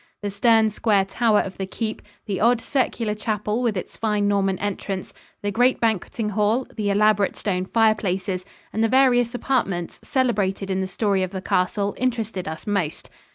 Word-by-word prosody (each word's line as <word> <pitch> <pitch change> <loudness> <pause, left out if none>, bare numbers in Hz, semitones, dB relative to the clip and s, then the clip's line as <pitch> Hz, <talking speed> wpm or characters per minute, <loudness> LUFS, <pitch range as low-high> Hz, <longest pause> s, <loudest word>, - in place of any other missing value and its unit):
The 205 - -2
stern 220 +1 +4
square 205 -2 +2
tower 215 +2 +2
of 195 - -7
the 190 - -2
keep, 220 +2 -4 0.2
the 200 -4 -2
odd 235 +2 +4
circular 235 -4 -1
chapel 210 +1 -2
with 230 -5 0
its 180 - -6
fine 210 -2 +1
Norman 195 -2 +1
entrance, 195 -1 -4 0.3
the 205 - 0
great 245 +5 +3
banqueting 220 0 -1
hall, 215 +5 +1
the 210 -2 -1
elaborate 205 0 +3
stone 185 -3 -1
fireplaces 195 -4 +1 0.3
and 220 - +1
the - - +4
various 245 -2 +4
apartments 195 -10 -1
celebrated 205 -7 0
in 190 0 0
the 190 - -2
story 195 0 0
of 185 - -1
the 190 0 -5
castle 200 +2 0
interested 225 -7 -2
us 160 0 -6
most. 200 -7 -2
210 Hz, 170 wpm, -23 LUFS, 195-225 Hz, 0.3 s, stern